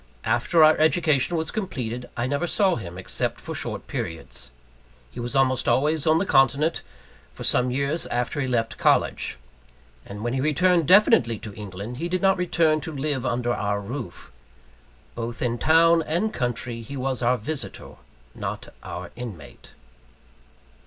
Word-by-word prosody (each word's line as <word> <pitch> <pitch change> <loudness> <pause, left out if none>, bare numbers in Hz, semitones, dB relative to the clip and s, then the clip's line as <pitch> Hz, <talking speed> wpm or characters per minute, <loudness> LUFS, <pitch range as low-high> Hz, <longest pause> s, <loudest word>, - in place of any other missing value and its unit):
After 120 +9 +3
our 155 0 +7
education 160 -1 +2
was 160 0 -1
completed, 125 - -4
I 120 - 0
never 145 +6 -1
saw 195 +1 +2
him, 90 -5 -7
except 95 - -3
for - - -6
short - - -4
periods. 80 -5 -5 0.6
He - - -9
was 120 +3 -4
almost 130 -2 +2
always 150 +3 +1
on 155 +1 +5
the 190 - +1
continent, 140 +2 +3 0.5
for - - -9
some 125 0 +3
years 140 +5 0
after 125 +4 -2
he 130 - -1
left 115 -3 -1
college. - - +1 0.7
And 105 +1 -8
when 120 0 -1
he 130 - 0
returned 165 +2 +2
definitely 155 - +5
to 105 -1 -9
England, 105 +3 -7
he 170 +5 -3
did 185 +1 -1
not 195 0 +4
return 165 -3 +2
to 160 - -6
live 140 -3 -2
under 120 0 0
our 105 -2 -1
roof. 115 -1 -7 0.8
Both 115 0 -5
in 120 -1 -1
town 165 +1 +5
and 195 +8 0
country 120 - -3
he 140 +5 -7
was 130 -1 -2
our 125 +1 +2
visitor, 140 +6 -5 0.4
not - - -5
our - - -7
inmate. 105 - -10
130 Hz, 160 wpm, -24 LUFS, 120-160 Hz, 0.8 s, our